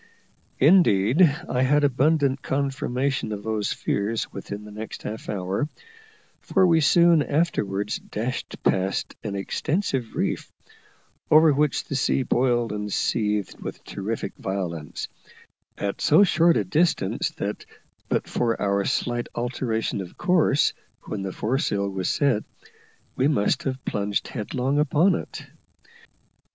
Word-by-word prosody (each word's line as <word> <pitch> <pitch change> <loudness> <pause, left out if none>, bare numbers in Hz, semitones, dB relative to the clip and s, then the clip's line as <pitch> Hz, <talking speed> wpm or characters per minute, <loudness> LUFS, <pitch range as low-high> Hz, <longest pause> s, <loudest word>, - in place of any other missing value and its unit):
Indeed, 140 - +4 0.3
I 125 - 0
had 145 +3 +3
abundant 140 0 +2
confirmation 135 -2 -1
of 105 -1 -5
these 110 -1 -1
fears 105 +3 -2
within 100 +1 -7
the 105 - -11
next 110 +2 -7
half 110 +1 -6
hour, 100 +7 -2 0.7
for 190 - +2
we 165 -2 +4
soon 170 +2 +5
afterwards 110 - -1
dashed 120 +4 -5
past 95 +1 0
an 105 -3 -4
extensive 135 - -2
reef - - -2 0.8
over 155 0 +6
which 150 0 +1
the - - -7
sea 135 0 +1
boiled 120 -2 +1
and 105 0 -4
seethed 105 -2 -1
with - - -7
terrific 105 +3 -4
violence 90 -6 -4 0.7
at 100 -1 -3
so 155 +7 +6
short 170 -2 +4
a - - +1
distance 165 - +1
that, - - -3 0.5
but - - 0
for 115 -2 0
our 100 -1 +1
slight 120 -2 -1
alteration 120 -3 -2
of 90 - -10
course 175 -5 +3 0.3
when 105 - -5
the 95 -1 -3
foresail 105 - -1
was 95 -2 -2
set, 135 -7 +1 0.7
we 130 - +2
must 105 -9 +1
have 130 -1 -4
plunged 100 0 -1
headlong 130 +4 -1
upon 155 +6 +3
it. - - -5
120 Hz, 130 wpm, -24 LUFS, 105-145 Hz, 0.8 s, over